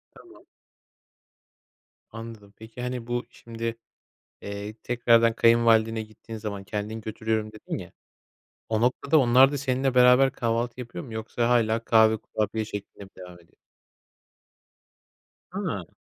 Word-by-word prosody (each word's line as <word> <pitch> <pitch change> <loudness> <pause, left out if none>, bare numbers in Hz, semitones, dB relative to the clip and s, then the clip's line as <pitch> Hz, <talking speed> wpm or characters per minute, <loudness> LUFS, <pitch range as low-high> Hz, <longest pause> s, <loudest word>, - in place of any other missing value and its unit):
Tamam. - - -17 1.6
Anladım 115 -3 -10
peki, 110 +2 -10
hani, 125 -1 -4
bu 120 0 -2
şimdi, 115 0 -6 0.7
eee, 100 +1 -6
tekrardan 115 -1 +3
kayınvalidene 115 -1 +4
gittiğin 110 +1 -10
zaman 100 -2 -6
kendin 105 +3 -4
götürüyorum 110 0 -3
dedin 110 - -6
ya, - - -10 0.8
o 110 0 0
noktada 140 +5 +2
onlar 130 +2 +6
da 145 - -2
seninle 130 -1 -1
beraber 125 +2 +6
kahvaltı 120 +1 -2
yapıyor 120 -1 -7
mu 115 -4 -10
yoksa 115 +2 -2
hâlâ 115 -1 +2
kahve, 110 -1 +4
kurabiye 110 +1 -3
şeklinde 105 -1 -8
mi 95 - -14
devam 90 -1 -11
ediyor? 85 - -25 2.0
Ha. - - -4
115 Hz, 125 wpm, -26 LUFS, 110-120 Hz, 2.0 s, onlar